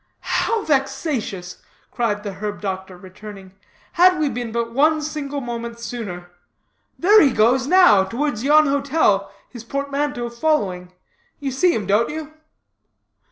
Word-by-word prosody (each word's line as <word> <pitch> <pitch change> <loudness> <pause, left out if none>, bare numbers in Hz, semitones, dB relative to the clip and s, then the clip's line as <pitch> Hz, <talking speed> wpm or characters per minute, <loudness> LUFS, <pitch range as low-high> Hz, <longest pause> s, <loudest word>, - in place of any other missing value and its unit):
"How 455 -2 -1
vexatious!" 270 - -2 0.3
exclaimed 210 -4 -2
the 200 -2 -5
herb 205 +2 -5
doctor, 190 -2 -5
returning. 190 +1 -12 0.4
"Had 365 +1 +4
we 300 -2 +1
been 240 -2 -5
but 230 0 -3
one 310 +4 +3
single 290 -2 -4
moment 235 -1 -6
sooner. 200 -7 -7 0.7
There 415 +5 +6
he 285 - +5
goes, 250 +3 +2
now, 355 - +6
towards 240 +2 -3
yon 305 +2 +5
hotel, 275 -9 +1 0.2
his 240 -3 -11
portmanteau 280 -1 -3
following. 205 - -1 0.5
You 275 -2 -3
see 340 +7 +2
him, 210 - -3
don't 210 +4 +2
you?" 310 0 -7
240 Hz, 135 wpm, -21 LUFS, 205-295 Hz, 0.7 s, There